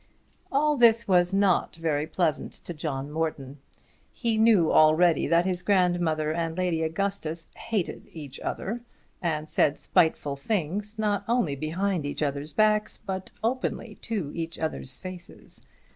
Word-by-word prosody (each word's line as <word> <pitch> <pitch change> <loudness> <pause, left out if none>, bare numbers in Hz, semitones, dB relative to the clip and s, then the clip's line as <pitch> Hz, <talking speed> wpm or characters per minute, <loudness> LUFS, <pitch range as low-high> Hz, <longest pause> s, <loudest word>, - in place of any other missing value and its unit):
All 295 +1 +2
this 235 -1 +5
was 180 -2 +4
not 195 -2 +2
very 155 -2 -1
pleasant 160 -2 0
to 175 - -8
John 145 -3 -4
Morton. 150 -3 -3 0.5
He 230 -2 -1
knew 220 -7 +5
already 155 +1 +5
that 170 +3 +3
his 185 -1 -1
grandmother 175 -5 +2
and 165 0 -2
Lady 180 -3 0
Augustus 165 -1 -2
hated 215 -6 -3
each 145 -5 -8
other, 230 +5 -3 0.4
and 155 -3 -1
said 150 -1 +2
spiteful 150 -3 +1
things 200 +6 -2
not 205 -2 0
only 230 - +1
behind 170 +4 -1
each 145 - -2
other's 145 +1 -2
backs, 215 +5 +2
but 190 -1 -5
openly 235 -2 -1
to 200 -11 -3
each 165 0 -4
other's 135 -4 -2
faces. 185 -1 -8
175 Hz, 140 wpm, -27 LUFS, 155-200 Hz, 0.5 s, this